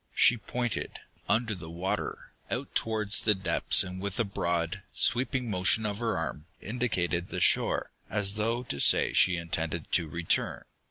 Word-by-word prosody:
She 125 - +6
pointed, 120 +3 -3 0.3
under 115 -1 +1
the 85 -4 -8
water, 85 +3 -4 0.2
out - - -4
towards 110 -2 +1
the 105 -1 +4
depths 95 - +3
and 90 0 -7
with 100 +3 -4
a - - +4
broad, 85 -2 -2
sweeping 125 +1 +2
motion 100 +2 +3
of 105 0 -3
her 115 -5 -1
arm, 80 -1 -4
indicated 95 -7 -2
the - - -4
shore, - - +2 0.2
as 100 -1 0
though 115 +3 -1
to 70 - -5
say - - +5
that - - -6
she 90 -1 +5
intended 85 -1 -3
to 85 -3 +2
return. 85 +1 -1
100 Hz, 165 wpm, -29 LUFS, 85-115 Hz, 0.3 s, She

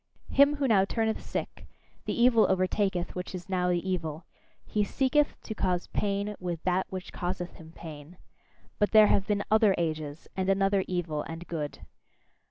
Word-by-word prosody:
Him 285 +1 +5
who 285 -2 0
now 205 -5 +5
turneth 220 +2 -1
sick, - - -5 0.4
the - - -2
evil 235 -2 +5
overtaketh 185 -1 0
which 180 +1 -5
is 180 - -8
now 180 -2 0
the 175 +1 0
evil: 165 -3 -3 0.4
he 210 - 0
seeketh 275 +7 +1
to 220 - -5
cause 180 -4 0
pain 205 0 -1
with 175 -3 -4
that 185 +1 +1
which 185 -1 -7
causeth 175 0 -3
him 160 -1 -13
pain. 155 +1 -10 0.6
But 205 +1 +1
there 215 -1 +9
have 195 - +1
been 205 -1 +1
other 215 -3 +5
ages, 155 -2 -3
and 190 0 -1
another 195 0 +3
evil 170 -4 -2
and 165 +2 -7
good. 150 -4 -4
185 Hz, 170 wpm, -28 LUFS, 175-210 Hz, 0.6 s, there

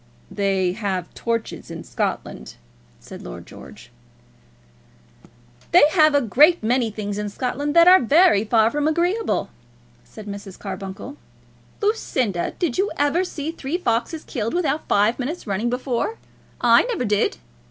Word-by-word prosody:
"They 195 -3 0
have 190 -3 -4
torches 230 -1 -4
in - - -7
Scotland," 65 - -4 0.4
said - - -11
Lord - - -9
George. - - -13 1.8
"They 350 - +7
have 310 -3 +4
a 285 - +4
great 295 - +4
many 240 +1 +1
things 205 -1 -5
in 210 0 -3
Scotland 275 +7 -3
that 335 0 +7
are 370 +1 +8
very 265 - +4
far 220 0 +3
from 295 0 0
agreeable," 350 +8 0 0.5
said 215 - -12
Mrs. 200 -2 -8
Carbuncle. 195 +7 -7 0.7
"Lucinda, 255 - -1
did 345 -4 -1
you 405 +2 +2
ever 290 +5 +2
see 320 -4 -5
three 320 0 -4
foxes 310 +1 -2
killed 230 -2 -3
without 310 -4 -1
five 210 +5 +2
minutes' 290 +7 -4
running, 210 +3 -1
before? 250 - -2 0.4
I - - +5
never 470 - -2
did." 210 -1 +1
245 Hz, 140 wpm, -22 LUFS, 205-315 Hz, 1.8 s, are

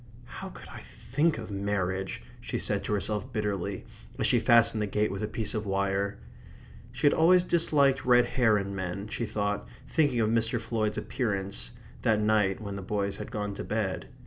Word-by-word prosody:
"How - - -8
could - - -12
I - - -9
think 145 +5 -1
of 110 -2 -7
marriage!" 95 -1 -2 0.2
she - - -3
said - - 0
to - - -1
herself 105 +4 -2
bitterly, 100 -4 -2 0.3
as - - 0
she - - +4
fastened 115 -2 +5
the 105 - 0
gate 105 +2 0
with 100 - -4
a 105 - -1
piece 110 0 -2
of 110 -1 -3
wire. 100 +1 0 0.7
She 130 +5 -3
had 145 - +6
always 175 +3 +5
disliked 145 -6 +3
red 125 -1 +5
hair 115 -5 +3
in 100 0 -3
men, 95 +2 -4
she 115 - -2
thought, 100 -1 -2 0.2
thinking 145 -7 +2
of 110 -1 +2
Mr. 115 +1 +1
Floyd's 110 -2 -1
appearance, 100 -5 -2 0.3
that 110 -3 +3
night 105 -3 +2
when 100 -2 -5
the - - -5
boys 100 0 -2
had - - -6
gone 105 -3 -3
to - - -5
bed. 105 -3 -2
105 Hz, 190 wpm, -28 LUFS, 100-120 Hz, 0.7 s, had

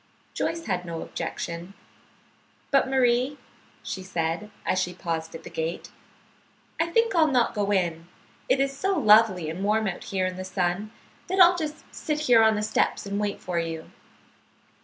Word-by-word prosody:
Joyce 335 0 -2
had 180 -3 -1
no 170 -2 -5
objection. 170 +2 -5 1.0
"But, 275 -2 +3
Marie," 255 +1 +2 0.5
she 190 - -5
said, 170 +2 -2 0.2
as 185 - +1
she 180 -1 -2
paused 165 -3 -4
at - - -9
the - - -8
gate, 160 +2 -4 0.9
"I 330 - +2
think 460 +6 +2
I'll 325 -3 +5
not 250 -5 +2
go 205 -2 -1
in. 170 -4 0 0.4
It 270 - +3
is 275 0 0
so 385 +5 0
lovely 210 - +5
and 165 +5 -4
warm 215 +2 +2
out 180 - -4
here 190 -1 -1
in 185 0 -3
the 185 - -4
sun 185 +2 -1 0.4
that 375 +2 -1
I'll 355 0 +8
just 310 -3 -5
sit 300 -1 -2
here 245 -6 +5
on 220 -1 +5
the 210 - -1
steps 215 -1 0
and 200 0 -2
wait 205 -1 -2
for 180 -2 -2
you." 165 -1 -5
205 Hz, 175 wpm, -26 LUFS, 175-270 Hz, 1.0 s, I'll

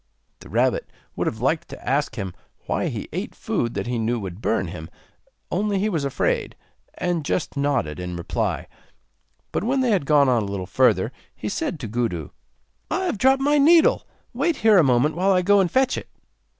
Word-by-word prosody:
The - - -13
rabbit - - +1 0.3
would - - -1
have 110 - -3
liked 150 +5 0
to - - -11
ask 135 -2 0
him 95 -6 -4 0.3
why - - -1
he - - -4
ate - - -4
food 115 - -2
that - - -2
he 120 -1 -2
knew 115 +2 0
would 95 -1 -7
burn 95 -7 0
him, 80 -2 -8 0.6
only 200 +2 0
he 205 +3 +1
was 165 -8 -1
afraid, 140 -1 -1 0.4
and 175 -3 -1
just 155 +2 -2
nodded 140 - 0
in 90 -1 -5
reply; 85 0 -2 0.9
but - - -1
when 260 +4 +1
they 250 -3 +2
had 185 -9 +1
gone 145 -2 +5
on 120 -3 +3
a - - -3
little 100 -2 -4
further, 95 - +2 0.2
he 105 - -4
said 155 - -3
to 115 - -4
Gudu: 105 -9 -2 0.6
'I - - 0
have 285 - -2
dropped 265 +3 +4
my 290 +1 +3
needle; 335 - +5 0.3
wait 340 -2 +1
here 215 -5 +5
a - - +6
moment 130 +3 +3
while 190 +3 +2
I 180 -1 +2
go 200 +2 +5
and 185 -3 +2
fetch 260 +4 +2
it. - - -13
145 Hz, 200 wpm, -23 LUFS, -, 0.9 s, a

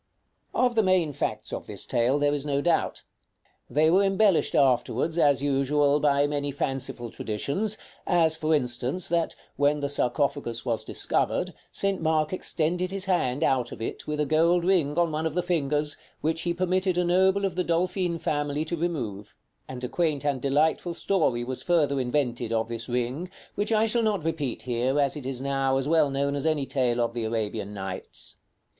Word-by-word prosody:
§ - - -49 0.6
VIII. - - +5
Of 245 - +1
the 225 - +3
main 185 -6 +2
facts - - -3
of - - -5
this - - -3
tale 120 +4 +2
there 145 0 +2
is 145 -2 -2
no 140 -1 0
doubt. 165 +2 0 0.7
They 155 +2 +3
were 190 +3 +5
embellished 195 -2 +3
afterwards, 135 +4 +2
as 140 -3 +4
usual, 145 +1 +2
by 145 -1 +3
many 145 -1 -2
fanciful 135 -4 -3
traditions; 190 - -2 0.3
as, 165 -3 +4
for 160 -1 +1
instance, 125 +5 -1
that, 170 -1 0 0.2
when 145 +1 +3
the 140 -1 -2
sarcophagus 140 -3 -1
was 115 -2 -1
discovered, - - -1 0.2
St. 195 -2 0
Mark 155 0 +1
extended 180 0 -1
his 195 0 -2
hand 165 -7 0
out 125 -4 +1
of - - -8
it, 115 - -5
with 150 0 -2
a 150 - +2
gold 170 +4 +3
ring 170 -6 +2
on 170 -2 +2
one 155 +1 -1
of 160 - -5
the 180 - +1
fingers, 150 -4 0 0.2
which 160 +1 0
he 170 0 -1
permitted 185 0 +1
a 180 - +3
noble 190 +3 +3
of 190 -3 -2
the 180 - 0
Dolfin 175 0 0
family 145 -1 -1
to 170 - -2
remove; 125 - -4 0.3
and 130 -1 -7
a - - -1
quaint 150 -1 -1
and 140 -3 0
delightful 155 +5 +1
story 155 -12 +1
was 130 +1 -2
further 150 -6 +2
invented 125 -3 -1
of 115 0 0
this 115 +1 -5
ring, 125 +8 -2 0.2
which 205 +2 -2
I 220 0 +4
shall 230 +2 +2
not 210 -6 0
repeat 155 -6 -2
here, 125 +3 0
as 140 0 +2
it 140 -4 -6
is 130 -1 -4
now 135 -1 +1
as 135 +1 -1
well 155 -2 +3
known 140 +1 -1
as 145 +3 -1
any 155 -3 +1
tale 130 -3 0
of 115 -1 0
the 120 -1 -3
Arabian 110 -2 -2
Nights. 95 -1 -6
145 Hz, 190 wpm, -26 LUFS, 130-170 Hz, 0.7 s, VIII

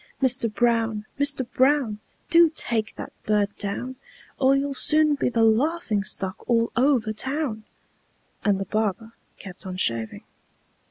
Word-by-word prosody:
Mister 255 -3 +3
Brown! 225 -2 0
Mister 285 -2 +2
Brown! 260 -3 +1 0.3
Do 335 -1 +6
take 225 -6 0
that - - -9
bird 205 -1 0
down, 240 +6 -4 0.4
Or 270 0 +4
you'll 280 0 -1
soon 305 +2 +5
be 280 - -1
the 230 -2 +1
laughing 225 - +1
stock 190 0 -3
all 230 -1 +1
over 245 -4 +1
town!" 260 -2 -2 0.8
And 200 -2 +1
the 195 - -3
barber 215 +2 -2 0.3
kept 190 -2 -12
on 185 0 -6
shaving. 115 -9 -2
230 Hz, 140 wpm, -24 LUFS, 210-275 Hz, 0.8 s, Do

